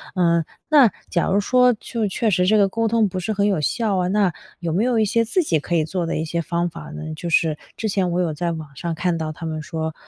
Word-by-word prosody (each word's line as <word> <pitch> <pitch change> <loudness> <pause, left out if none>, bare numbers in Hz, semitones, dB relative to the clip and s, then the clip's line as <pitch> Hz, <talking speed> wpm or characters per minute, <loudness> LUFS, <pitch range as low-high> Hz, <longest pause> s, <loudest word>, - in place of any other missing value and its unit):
呃， 170 -2 +3 0.3
那 285 -6 +7 0.2
假 175 - +1
如 200 - +2
说 250 +4 +4
就 220 0 -3
确 220 +4 0
实 180 -2 +2
这 215 +3 +4
个 200 -1 +5
沟 230 +2 0
通 225 -1 +3
不 185 - -4
是 215 +5 -2
很 200 0 +1
有 190 -6 +1
效 210 +4 0
啊， 180 -1 +1
那 195 -4 +2 0.3
有 170 -2 -3
没 200 +6 +2
有 245 -2 +2
一 215 - +3
些 230 +3 +2
自 365 - +1
己 160 - +1
可 170 +4 -2
以 160 - +3
做 175 0 -2
的 165 - -2
一 160 - -2
些 170 +1 -2
方 170 +1 -1
法 160 -2 -10
呢？ 155 0 -6
就 170 +2 -5
是 160 -2 +2 0.2
之 220 - -2
前 190 -3 0
我 175 - 0
有 165 -3 -1
在 170 +3 -2
网 155 -3 -6
上 170 +3 -3
看 175 0 0
到 155 -1 -3
他 165 - -8
们 155 -1 -3
说， 160 0 -4
180 Hz, 290 characters per minute, -22 LUFS, 165-210 Hz, 0.3 s, 那